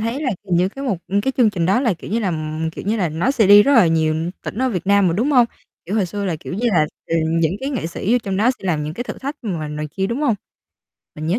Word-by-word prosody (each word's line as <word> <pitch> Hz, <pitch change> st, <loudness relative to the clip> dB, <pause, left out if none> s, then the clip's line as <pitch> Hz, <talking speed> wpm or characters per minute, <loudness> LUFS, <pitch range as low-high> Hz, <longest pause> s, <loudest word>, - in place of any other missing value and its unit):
thấy 230 Hz, +6 st, -2 dB
là 260 Hz, -, 0 dB
c 190 Hz, -, -21 dB
những 180 Hz, -1 st, +2 dB
cái 270 Hz, +7 st, -8 dB
mục 205 Hz, -10 st, -1 dB
ừ, 200 Hz, +2 st, +1 dB
cái 265 Hz, -, 0 dB
chương 235 Hz, -4 st, +4 dB
trình 175 Hz, -4 st, -1 dB
đó 200 Hz, +7 st, +3 dB
là, 230 Hz, -8 st, +1 dB
kiểu 170 Hz, -, -10 dB
như 225 Hz, -, +1 dB
là 190 Hz, -5 st, 0 dB, 0.4 s
kiểu -, -, -8 dB
như 220 Hz, +2 st, +1 dB
là, 180 Hz, -5 st, 0 dB
nó 165 Hz, -, 0 dB
sẽ 225 Hz, -7 st, +3 dB
đi 205 Hz, +1 st, +9 dB
rất 280 Hz, -, +2 dB
là 220 Hz, -8 st, +6 dB
nhiều 160 Hz, +1 st, +1 dB
tỉnh 215 Hz, -, -6 dB
ở 260 Hz, -, +2 dB
Việt 190 Hz, -6 st, -3 dB
Nam 200 Hz, -2 st, +4 dB
mà, -, -, +1 dB
đúng 245 Hz, +9 st, +1 dB
hông? 245 Hz, -4 st, +5 dB, 0.4 s
Kiểu 195 Hz, -, -3 dB
hồi 195 Hz, -4 st, +1 dB
xưa 200 Hz, +3 st, -4 dB
là, 175 Hz, -4 st, -1 dB
kiểu -, -, -7 dB
như 240 Hz, +5 st, -1 dB
là, 155 Hz, -5 st, +3 dB, 0.2 s
ờ, 165 Hz, -, 0 dB, 0.2 s
những 165 Hz, +4 st, +1 dB
cái 275 Hz, +2 st, -3 dB
nghệ 215 Hz, -, -2 dB
sĩ 190 Hz, +6 st, -2 dB
vô 250 Hz, -, +4 dB
trong 195 Hz, -2 st, -2 dB
đó 225 Hz, +5 st, +3 dB
sẽ -, -, -14 dB
làm 155 Hz, -4 st, 0 dB
những 155 Hz, +2 st, -5 dB
cái 245 Hz, -, -4 dB
thử -, -, -7 dB
thách 280 Hz, +2 st, -5 dB
mà 170 Hz, -8 st, -3 dB
này 150 Hz, 0 st, -4 dB
kia, 190 Hz, 0 st, 0 dB
đúng 235 Hz, +7 st, -3 dB
hông? 260 Hz, -8 st, +2 dB, 0.8 s
Mình 155 Hz, +1 st, -6 dB
nhớ 185 Hz, +8 st, +1 dB
200 Hz, 310 wpm, -20 LUFS, 170-235 Hz, 0.8 s, đi